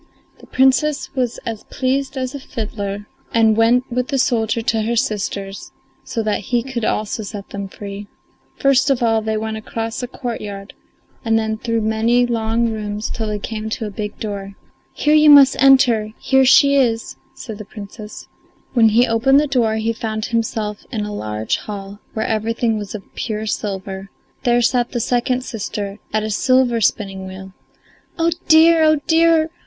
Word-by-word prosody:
The - - -16
Princess 265 +3 +2
was 250 -3 -1
as 225 -2 -5
pleased 270 +1 -2
as 255 0 -3
a 280 - -5
fiddler, 205 -5 -5 0.3
and 225 -1 +4
went 230 +3 +4
with 250 +1 -1
the 275 - -1
soldier 230 -3 +1
to 225 -1 +1
her 230 +2 -1
sisters, 200 -3 -3 0.3
so 225 - -3
that 215 -1 0
he 240 -2 0
could 255 -3 -4
also 215 +1 -1
set 205 -1 -7
them 200 -1 -5
free. 200 +1 -8 0.5
First 275 0 +3
of 265 -3 +1
all 225 -1 +2
they 220 0 -1
went 220 0 -3
across 225 +2 -4
a 245 - -3
courtyard 210 -6 -6 0.5
and 225 -2 +2
then 220 0 -1
through 230 +1 -2
many 225 +3 +2
long 230 0 0
rooms 210 -1 -4
till 220 -2 -3
they 210 0 -2
came 215 +1 -5
to 225 +1 -3
a 210 - -5
big 210 +1 -5
door. 200 -2 -5 0.4
"Here 300 - +1
you 305 0 +6
must 280 -2 +8
enter: 245 -6 +4
here 265 0 +3
she 280 +2 +6
is," 230 -4 0 0.2
said 220 -4 -8
the - - -6
Princess. 210 +1 -10 0.5
When 230 -3 +5
he 235 +3 +4
opened 250 +4 +3
the 300 - +2
door 240 -6 +1
he 220 +1 -1
found 220 -1 -3
himself 220 -3 -2
in 215 -4 -2
a 210 - -5
large 110 - -2
hall, 200 -1 -8 0.2
where 220 - -1
everything 225 +1 0
was 205 -1 -5
of 200 - -7
pure 215 -2 -3
silver; 195 -2 -4 0.4
there 240 0 +3
sat 240 0 +1
the 240 - -1
second 250 +2 0
sister 205 -3 -5
at 215 0 0
a 215 - -3
silver 255 +1 +2
spinning 195 -3 -1
wheel. 190 0 -10 0.6
"Oh, 335 0 +2 0.2
dear; 320 +1 +6
oh, 310 0 +5
dear!" 325 -1 +3
225 Hz, 175 wpm, -19 LUFS, 210-250 Hz, 0.6 s, must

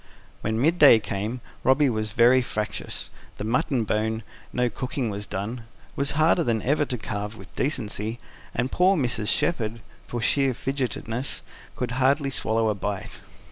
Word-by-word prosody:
When 110 +1 -1
midday 150 -3 +7
came, 110 +4 -3 0.2
Robby 130 +3 +5
was 110 -4 -1
very 125 +2 +6
fractious. 105 -4 -4 0.3
The - - -4
mutton 120 +2 +1
bone 110 +1 -1 0.3
no 125 0 +1
cooking 125 0 -2
was 100 +1 -5
done 110 +5 -4 0.3
was 140 +1 -1
harder 160 +2 +4
than 115 -6 0
ever 145 +3 +2
to 125 - -3
carve 105 0 -4
with 95 0 -13
decency; 110 -5 -1 0.4
and 125 +3 0
poor 185 +2 +4
Mrs. 120 -6 -1
Shepherd, 115 -4 0 0.3
for 120 - -3
sheer 135 +2 +2
fidgetiness, 130 -1 -3 0.3
could 125 -1 -2
hardly 140 +1 +3
swallow 110 -3 +1
a - - +2
bite. 100 -1 -5
120 Hz, 150 wpm, -25 LUFS, 110-135 Hz, 0.4 s, midday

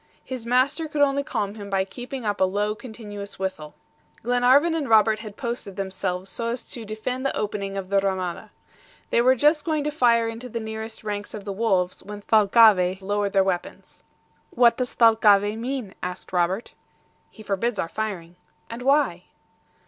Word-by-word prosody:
His 250 -3 -6
master 265 +6 +2
could 295 -1 +1
only 280 0 +2
calm 205 -7 -3
him 205 -2 -9
by 190 -1 +1
keeping 245 +4 -7
up 205 -2 -1
a - - +6
low, 205 +3 -1
continuous 210 -3 -9
whistle. 185 -6 -5 0.5
Glenarvan 250 +7 +4
and 310 -4 -2
Robert 220 -1 +5
had 215 -2 -9
posted 235 -5 -5
themselves 190 -1 -3
so 230 +3 -4
as 240 +2 -3
to 235 -2 -7
defend 220 +5 -4
the 275 - -1
opening 200 -2 -3
of 190 -1 -5
the 200 0 +3
RAMADA. 190 -3 -3 0.6
They 235 - +4
were 255 +2 +5
just 295 +4 +3
going 310 -3 -1
to 300 - -1
fire 235 -5 +3
into 230 +2 -6
the 230 - -4
nearest 220 0 -6
ranks 205 -1 -4
of 205 -2 -8
the 200 - -3
wolves 190 -4 0
when 205 0 -9
Thalcave 205 -4 +5
lowered 205 0 -1
their 195 -1 +4
weapons. 185 -2 -4 0.5
"What 235 -1 +4
does 250 -1 -3
Thalcave 215 -3 +5
mean?" 245 -4 -4
asked 180 +1 -6
Robert. 180 +5 0 0.6
"He 215 - -14
forbids 210 +3 -1
our - - -1
firing." 180 -4 -5 0.3
"And 230 +1 -6
why?" 265 - +2
215 Hz, 175 wpm, -24 LUFS, 195-245 Hz, 0.6 s, a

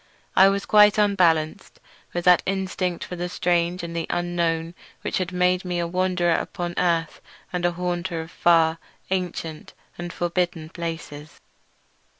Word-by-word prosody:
I 190 +1 +7
was 200 0 -1
quite 210 -1 +6
unbalanced 185 -4 +1 0.3
with 175 0 -3
that 180 -1 +6
instinct 185 -2 -2
for 180 - -6
the 175 0 -4
strange 175 0 0
and 170 0 -6
the 165 -1 -2
unknown 170 -1 -1 0.3
which - - -1
has 185 -1 -2
made 180 0 +2
me 180 -1 -3
a 170 - 0
wanderer 180 0 +1
upon 175 +1 -3
earth 170 -3 0 0.3
and 175 -1 -1
a 175 - -1
haunter 175 0 -2
of 160 +1 -7
far, 165 -1 +3 0.3
ancient, 175 -4 -3 0.3
and 175 0 -5
forbidden 175 -2 -2
places. 160 -3 -7
175 Hz, 150 wpm, -24 LUFS, 170-180 Hz, 0.3 s, I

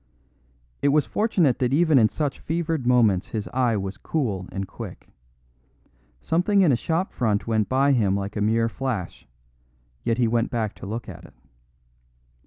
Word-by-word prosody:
It - - +2
was 145 +1 +3
fortunate 180 - +1
that 125 -1 +1
even 155 -2 +4
in 110 -2 +4
such 145 -3 -3
fevered 160 -5 -2
moments 110 -7 +3
his 110 -2 -4
eye 125 -4 +1
was 95 0 -4
cool 105 - -2
and 95 0 -4
quick. 95 - -9 1.1
Something 190 +5 +2
in 165 - +4
a - - +4
shop 165 +9 -1
front 110 -4 0
went 110 -2 0
by 135 +2 +3
him 105 -7 +2
like 100 0 -4
a 105 - -2
mere 115 +2 +2
flash; 115 -7 -4 0.8
yet 115 - 0
he 120 -2 +2
went 115 +1 +1
back 110 -3 -2
to - - -8
look 115 +4 -5
at - - -10
it. - - -17
120 Hz, 170 wpm, -24 LUFS, 105-145 Hz, 1.1 s, even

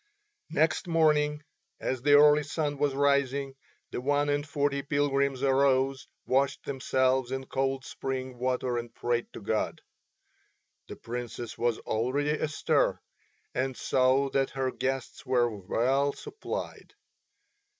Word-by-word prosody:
Next 160 +4 +1
morning, 150 -2 +2 0.4
as 130 -2 -2
the 145 +2 +4
early 150 +1 +7
sun 145 -1 -2
was 145 -2 +1
rising, 140 -1 +1 0.4
the - - -3
one 145 +2 +1
and 145 +1 0
forty 140 -2 0
pilgrims 140 -2 0
arose, 135 -1 +2 0.2
washed 135 +2 +1
themselves 130 -1 +1
in 135 0 -3
cold 135 -1 -1
spring 130 -2 -5
water 125 -1 0
and 120 0 -7
prayed 120 0 -1
to - - -8
God. 110 +1 -1 1.1
The - - -8
Princess 120 -1 -6
was 120 -1 0
already 130 +7 -1
astir 155 0 +1 0.5
and 130 0 -1
saw 130 +1 +2
that 135 -1 +1
her 130 -1 0
guests 135 0 -3
were 120 -3 +1
well 130 +8 +1
supplied. 420 0 -7
135 Hz, 125 wpm, -29 LUFS, 130-145 Hz, 1.1 s, early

